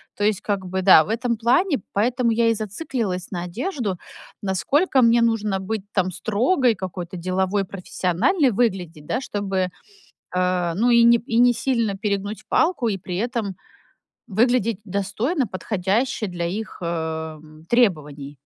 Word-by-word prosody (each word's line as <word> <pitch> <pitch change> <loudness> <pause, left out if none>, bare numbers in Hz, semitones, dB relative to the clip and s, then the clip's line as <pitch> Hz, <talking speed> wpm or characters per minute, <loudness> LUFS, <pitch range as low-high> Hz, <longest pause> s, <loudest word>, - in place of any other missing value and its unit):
То 205 - -3
есть 210 -2 +1
как 205 -2 -1
бы 190 +1 -2
да, 185 -4 +8
в - - -10
этом 235 +1 -1
плане. 270 - +2 0.2
Поэтому 235 +3 +1
я 230 0 +3
и - - +3
зациклилась 210 - -4
на 175 -2 -3
одежду, 220 - -3 0.5
насколько 265 - +2
мне 235 0 +5
нужно 215 -4 +1
быть 200 +2 -3
там 185 -2 0
строгой, 230 - +1
какой-то 185 -2 -6
деловой, 190 +3 0
профессиональной 195 - 0
выглядеть, 185 -9 -1
да, - - 0
чтобы, 195 -5 -2 0.7
э, 180 -2 +1
ну 230 +6 +2
и 235 0 +6
не 235 0 +7
и 230 0 -1
несильно 235 -3 +2
перегнуть 205 +1 -3
палку, 315 -8 +2
и 200 - -1
при 180 -1 -5
этом 225 -3 -2 0.7
выглядеть 230 -1 +1
достойно, 210 - -1
подходяще 205 +4 -1
для 175 -2 -3
их, 210 +6 -5
эм, 160 -2 -5
требований. 150 - +1
205 Hz, 145 wpm, -22 LUFS, 185-235 Hz, 0.7 s, да